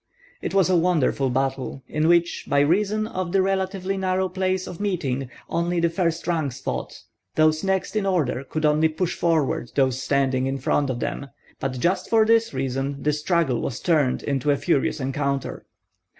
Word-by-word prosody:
It - - -3
was 195 -3 +4
a 185 - +3
wonderful 165 -6 +2
battle, 135 +1 -2
in 155 +1 0
which, 170 0 +2
by 140 - +3
reason 205 +8 +2
of 185 -5 -4
the 195 - +3
relatively 190 0 -1
narrow 190 0 0
place 185 0 -1
of 180 - -8
meeting, 140 -11 -2 0.2
only 170 +1 0
the 170 0 +2
first 170 -1 -1
ranks 155 -7 -1
fought, - - -5 0.3
those 155 0 +3
next 190 +1 -1
in 205 -2 0
order 150 -8 0
could 155 +3 -2
only 150 +1 +4
push 165 +3 -2
forward 155 -7 0
those 130 -2 +2
standing 135 -2 +1
in 135 0 -1
front 135 +1 0
of 120 -2 -3
them; 140 - -3 0.3
but 130 -2 -3
just 180 +5 0
for 220 -1 +4
this 230 0 +3
reason 135 +1 -3
the 150 - +2
struggle 150 -4 +1
was 120 - -3
turned 150 -7 +1
into 140 0 -1
a 140 - +3
furious 150 -2 0
encounter. 140 0 -2
155 Hz, 180 wpm, -24 LUFS, 135-185 Hz, 0.3 s, was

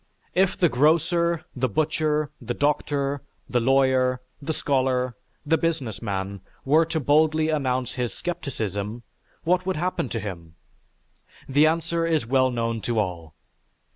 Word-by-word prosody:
If 185 0 +2
the 175 - +4
grocer, 165 +4 +2
the 130 0 0
butcher, 155 +3 0
the 120 0 -3
doctor, 145 -1 0 0.3
the 125 - +1
lawyer, 130 0 +3 0.2
the 145 - -2
scholar, 130 -4 0 0.3
the 160 +1 +2
business 145 -10 -2
man, 100 -2 -3 0.2
were 155 +4 +5
to 160 0 -2
boldly 155 +2 +3
announce 130 -5 0
his 125 -2 -2
scepticism, 115 - -4 0.4
what 180 +2 +1
would 190 - +1
happen 175 -5 -1
to 115 - -2
him? 85 -6 -7 0.9
The 145 +3 +5
answer 165 +1 0
is 160 -6 +1
well 130 +1 +3
known 115 -2 -2
to 115 +3 -2
all. 85 -6 -2
135 Hz, 140 wpm, -25 LUFS, 120-160 Hz, 0.9 s, were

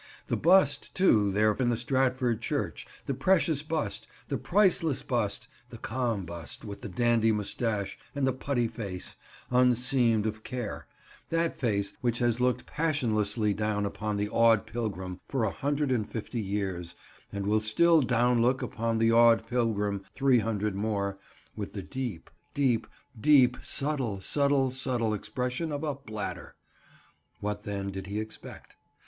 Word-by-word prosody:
"The - - -1
bust, 185 +4 +3
too, 110 - +4
there 105 +2 +3
in 125 +2 0
the 120 - +1
Stratford 125 -1 +1
church. - - -3 0.2
The 140 - -1
precious 160 +1 +2
bust, 150 -10 -3 0.2
the - - 0
priceless 175 -7 +2
bust, 115 -6 -1 0.2
the - - -9
calm 115 -7 -2
bust 85 +4 -8
with 100 -1 -7
the 110 - -6
dandy 115 +2 +2
moustache 105 0 -2 0.2
and 140 -1 +1
the 130 - +2
putty 130 -2 -1
face, 100 -5 -6 0.4
unseamed 125 -2 +3
of 110 0 -3
care—that 130 +7 -4
face 100 -6 -1
which 120 -2 0
has 120 0 +1
looked 125 0 +1
passionlessly 110 -9 0
down 105 0 -1
upon 105 +1 -3
the 105 0 0
awed 115 -2 +4
pilgrim 100 -5 -4
for 135 -4 -1
a 110 - +1
hundred 145 0 -1
and 110 -5 0
fifty 115 +1 -4
years, 95 -4 -3 0.4
and 100 -1 -4
will 105 +2 +3
still 155 +10 +4
down 125 -1 +2
look 130 +3 +2
upon 115 -2 -1
the 115 0 +3
awed 115 0 +5
pilgrim 105 -5 0
three 135 -3 +4
hundred 105 -2 -1
more, 100 -1 -2 0.4
with 100 - -5
the 100 - -5
deep, 120 -3 -5 0.3
deep, 130 -5 +1 0.3
deep, 130 -1 +5
subtle, 135 -8 -1
subtle, 140 +4 +2
subtle 125 -4 0
expression 125 - -3
of 145 +1 -3
a 150 -2 0
bladder." 110 -7 -6 0.8
What, 105 0 -3
then, 100 -1 -4
did 95 0 -6
he 100 +2 -3
expect? 110 0 -9
115 Hz, 150 wpm, -29 LUFS, 105-130 Hz, 0.8 s, awed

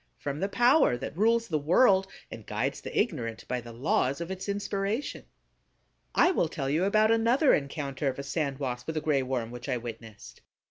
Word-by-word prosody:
From 145 +1 -4
the 195 - -1
power 245 - +4
that 120 - -6
rules 230 +4 +2
the 155 -3 0
world, 190 - +4 0.2
and 110 - -8
guides 115 +7 -2
the - - -3
ignorant 125 - -2
by 125 -1 -2
the 120 0 -10
laws 130 +3 0
of 170 +2 -5
its 190 +2 -5
inspiration. 200 +4 -2 0.9
I 355 - +5
will 175 - +1
tell 140 -4 -3
you 165 +6 +2
about 215 +2 +3
another 235 +6 +4
encounter 140 -1 -2
of 130 - -1
a 140 - -5
Sand 140 -2 -2
Wasp 125 -3 -4
with 160 -1 -3
a - - 0
Gray 150 -3 +1
Worm 125 -3 -3
which 120 +2 -8
I 125 - +1
witnessed. 115 -2 -10
150 Hz, 195 wpm, -28 LUFS, 125-200 Hz, 0.9 s, I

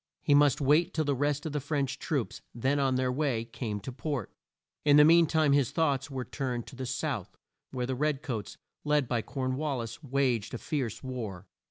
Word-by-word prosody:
He 145 - +3
must 145 -1 +5
wait 150 +4 +3
till 155 -1 +1
the 145 - +2
rest 145 +2 0
of 160 - -2
the 150 - -1
French 140 -1 -2
troops, - - -2
then 135 +4 +1
on 135 -2 +2
their 130 0 +1
way, 130 -4 0
came 115 -3 -4
to 130 - -6
port. 140 +1 -4 0.5
In 145 -1 +6
the 150 - +9
mean 165 +1 +6
time 155 -2 +3
his 140 -4 +3
thoughts 145 -5 0
were 130 -2 -4
turned 125 -4 -3
to - - -11
the 130 0 -5
South, 130 - -3 0.3
where 125 -2 -3
the 130 - -2
red 145 +2 0
coats, 115 -9 -4 0.3
led 150 -3 +2
by 120 -1 0
Corn 130 +1 -3
wal 150 -2 -1
lis, 115 +2 -6
waged 130 -6 0
a - - -2
fierce 130 -4 -3
war. 110 -8 -5
135 Hz, 210 wpm, -29 LUFS, 125-145 Hz, 0.5 s, the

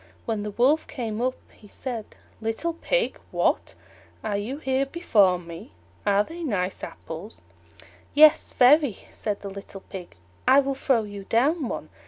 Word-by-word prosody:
When 220 -2 -1
the 210 - -3
Wolf 260 +9 +2
came 230 -5 -4
up 255 +1 +1 0.2
he 210 - -17
said, 230 0 -6 0.3
"Little 225 +10 -1
Pig, - - 0
what! - - 0 0.5
are 215 -2 -1
you 215 +7 -3
here 265 -2 0
before 210 - +3
me? 170 - -10 0.3
Are 205 0 +4
they 330 +9 -9
nice 200 - -2
apples?" 170 +7 -8 0.7
"Yes, 305 +1 +7
very," 265 -3 +5
said 210 -2 -3
the 200 - -6
little 195 0 -9
Pig; 185 -2 -9 0.3
"I 265 +2 +8
will 275 0 +1
throw 265 -3 +1
you 205 -2 -8
down 275 - +2
one." - - -5
230 Hz, 155 wpm, -25 LUFS, 200-275 Hz, 0.7 s, I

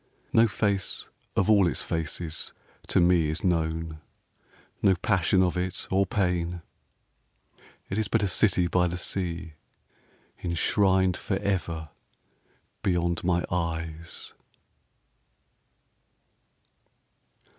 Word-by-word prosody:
No 115 +1 +6
face 100 -2 0 0.3
of 100 - +2
all 100 -4 +5
its 85 - -1
faces 80 0 -2 0.3
to - - +3
me 85 -3 +4
Is 80 - -2
known 80 -3 -1 0.8
no 95 -2 +5
passion 95 -1 +2
of 90 -1 +1
it 90 0 -3
or 95 0 +3
pain. 90 -3 -1 1.2
It 95 - -2
is 110 - 0
but - - +1
a - - +2
city 90 0 +3
by 90 +1 +2
the 90 +1 -3
sea, 85 -2 -2 0.9
Enshrined 95 +1 +2
forever 95 -6 -2 0.9
beyond 85 -2 0
my 85 -1 +1
eyes! 80 -1 -4
90 Hz, 100 wpm, -27 LUFS, 85-95 Hz, 1.2 s, No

